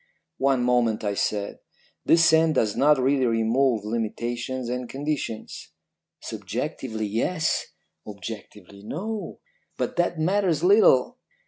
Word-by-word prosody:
"'One 135 -2 +2
moment,' 120 -3 +1
I 100 -1 0
said. 100 0 -2 0.5
'This 165 0 +6
scent 160 -1 +4
does 105 -2 +1
not 150 +1 +4
really 130 0 +2
remove 115 0 +1
limitations 120 +3 -3
and 125 0 -4
conditions.' 140 -5 -5 0.5
"'Subjectively, 110 -4 -4
yes, 120 - -1 0.4
objectively, 100 -1 -9
no; 205 - -5 0.4
but - - -3
that 175 -1 +1
matters 175 -1 +1
little. 205 - +4
125 Hz, 110 wpm, -25 LUFS, 110-155 Hz, 0.5 s, This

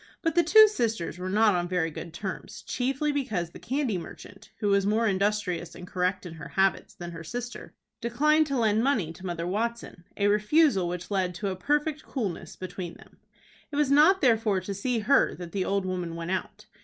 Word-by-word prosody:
But 330 - +1
the 345 - +5
two 435 +6 +8
sisters 225 - -2
were 185 +1 -3
not 210 +2 +4
on 175 -1 0
very 175 -3 0
good 170 +2 -7
terms, 190 +3 -6
chiefly 270 +4 -1
because 215 - -2
the - - -11
candy 260 -7 -1
merchant, 195 +3 -12
who 210 -2 0
was 200 0 +3
more 215 +3 +2
industrious 190 -4 -1
and 180 - -9
correct 185 +1 -1
in 170 - -7
her 160 - -9
habits 195 0 0
than 175 -1 -7
her 165 -1 -8
sister, 245 +8 -7 0.3
declined 300 +6 +3
to 275 -2 -1
lend 220 -1 +2
money 220 - +1
to 185 - -14
Mother 170 -1 -3
Watson, 220 -1 -3
a 200 - +1
refusal 210 - +3
which 180 +3 -5
led 185 -3 0
to 200 +2 -2
a 190 - -3
perfect 295 - 0
coolness 210 - -4
between 185 -2 -6
them. - - -18 0.5
It - - -5
was 290 -2 +2
not 315 +7 +6
therefore 225 -6 +3
to 200 +2 -5
see 235 +5 -1
her 275 +7 +3
that 175 -2 -8
the 195 -2 -1
old 200 -1 0
woman 180 -3 -3
went 170 +1 -4
out. 205 +3 -4
205 Hz, 205 wpm, -27 LUFS, 180-250 Hz, 0.5 s, two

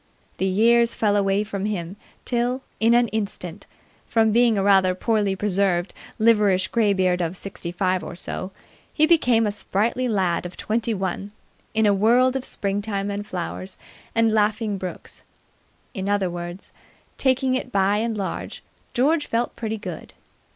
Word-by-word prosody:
The 190 - 0
years 230 +4 +4
fell 205 -2 +2
away 200 0 +2
from 200 -2 -4
him 190 -3 -3 0.3
till, 245 +2 -1 0.2
in 230 +1 +4
an 240 0 +4
instant, 200 -3 -4 0.4
from 225 -1 +3
being 235 -1 +4
a 195 - +1
rather 190 -2 +4
poorly 205 -1 0
preserved, 190 -2 0 0.2
liverish 210 -4 +3
greybeard 190 -5 +2
of 175 +2 -2
sixty 180 -3 -6
five 185 0 0
or - - -7
so, 185 +2 -5 0.4
he 310 - +4
became 250 -9 +4
a 210 - 0
sprightly 220 +5 -1
lad 190 -7 0
of 175 0 -8
twenty 225 +1 -1
one 195 +1 -4 0.4
in 220 0 +3
a 205 - +5
world 240 +6 +3
of 265 - -2
springtime 200 0 -2
and 205 +1 -5
flowers 185 +1 -5 0.4
and 225 -1 +3
laughing 215 -1 +1
brooks. 185 -1 -7 0.7
In 195 -3 -3
other 200 -3 +1
words, 175 +2 -7 0.5
taking 260 -1 +2
it 255 -1 -2
by 200 0 +2
and 225 0 -1
large, 195 -2 -5 0.3
George 295 +5 +2
felt 235 +1 -1
pretty 220 -1 -3
good. 210 - -8
205 Hz, 155 wpm, -23 LUFS, 190-230 Hz, 0.7 s, a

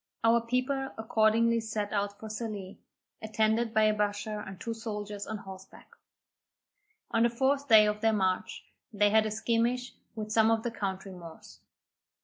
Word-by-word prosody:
Our 230 +1 +4
people 255 +3 -1
accordingly 225 +1 +2
set 215 -2 -3
out 200 0 -2
for 220 - -8
Sallee, 215 -3 -6 0.4
attended 220 +1 +1
by 220 -1 +3
a 215 0 +4
bashaw 210 0 -2
and 190 -1 -9
two 230 +3 -4
soldiers 210 -2 -6
on 220 - -4
horseback. 190 -1 -12 1.2
On 225 - +2
the 235 - +4
fourth 270 +4 0
day 220 -3 +8
of 210 0 -1
their 225 0 +3
march, 190 0 -1 0.3
they 205 -1 +2
had 220 0 +4
a - - -2
skirmish 235 +3 0 0.2
with 215 -1 -5
some 220 0 +4
of 225 -1 +1
the 240 - -2
country 195 -3 -4
Moors. 170 -3 -12
220 Hz, 160 wpm, -29 LUFS, 205-230 Hz, 1.2 s, day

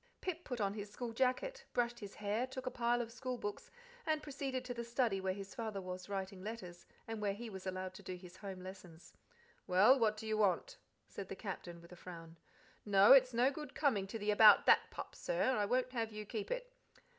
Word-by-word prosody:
Pip 350 -2 -4
put 250 -3 -4
on 200 -1 +1
his 205 -1 -6
school 230 +2 -5
jacket, 265 - 0
brushed 240 0 0
his 200 -2 -8
hair, 210 +4 -1
took 260 0 -7
a 255 - -1
pile 240 0 +1
of 230 - -9
school 255 +1 -4
books, 205 -3 -5 0.3
and 310 -1 0
proceeded 270 -3 -3
to 250 - -3
the 235 -1 -4
study 235 -4 0
where 190 0 -1
his 195 -1 -8
father 220 -4 -4
was 185 0 -6
writing 190 -1 -4
letters, 190 -5 -7 0.2
and 225 -1 -4
where 200 -1 0
he 230 +1 -7
was 190 -1 -7
allowed 185 0 -3
to - - -11
do 185 - -5
his 180 0 -12
home 190 -2 -7
lessons. 180 -3 -11 0.5
"Well, 210 +9 +6
what 215 -2 +2
do 220 - -7
you 215 0 0
want?" 215 - +1 0.3
said 195 - -8
the - - -4
Captain, 175 -4 -6
with 170 - -15
a - - -9
frown. 165 -2 -10 0.4
"No, 200 -1 +6
it's 260 -2 +7
no 245 +3 +3
good 295 -1 -8
coming 220 -10 +2
to 225 - -5
the 210 0 0
about 210 0 +8
that - - +5
pup, - - -7
sir - - 0
I 210 - +1
won't 255 +4 +1
have 230 -3 -2
you 210 0 -6
keep 210 0 -4
it." - - -4
215 Hz, 225 wpm, -36 LUFS, 195-250 Hz, 0.5 s, about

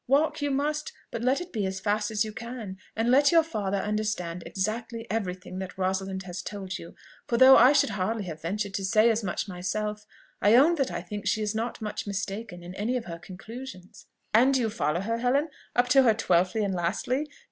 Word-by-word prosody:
Walk 290 +4 +2
you 290 - 0
must, 295 +2 -1 0.2
but 230 - -4
let 255 +3 +2
it 355 - -8
be 215 -4 -1
as 190 0 -4
fast 210 +1 0
as 220 0 0
you 215 - -6
can, 225 -5 -7 0.2
and 225 +2 +1
let 280 +2 +5
your 330 -1 +6
father 205 -11 -2
understand 210 -4 -2
exactly 225 +4 -3
every 200 -5 -1
thing 185 0 -9
that 190 -1 -6
Rosalind 190 0 -1
has 180 -1 -6
told 195 -2 -5
you; 170 - -11 0.3
for 235 - +1
though 260 +2 +9
I 250 +3 +8
should 290 - +3
hardly 205 +2 -1
have 160 -4 -7
ventured 200 +4 -3
to 195 - -2
say 215 +4 +4
as 225 0 -1
much 190 +2 -2
myself, 210 +3 -3 0.3
I 210 +3 +6
own 290 +7 +6
that 275 -3 +1
I 175 0 -4
think 205 +2 -6
she 215 +1 +1
is 210 0 -1
not 225 +1 -3
much 210 0 -4
mistaken 195 -2 -4
in 175 +1 -8
any 220 +6 -1
of 240 - -5
her 170 -1 -7
conclusions." 190 +3 -10 0.3
"And 255 +5 +5
do 260 - +2
you 225 - +1
follow 170 -5 0
her, 230 +3 -2
Helen, 275 +6 +2 0.3
up 245 0 +3
to 270 +2 +7
her 230 -4 +4
twelfthly 185 0 +2
and 195 - -1
lastly? 200 - -1
215 Hz, 220 wpm, -27 LUFS, 190-240 Hz, 0.3 s, though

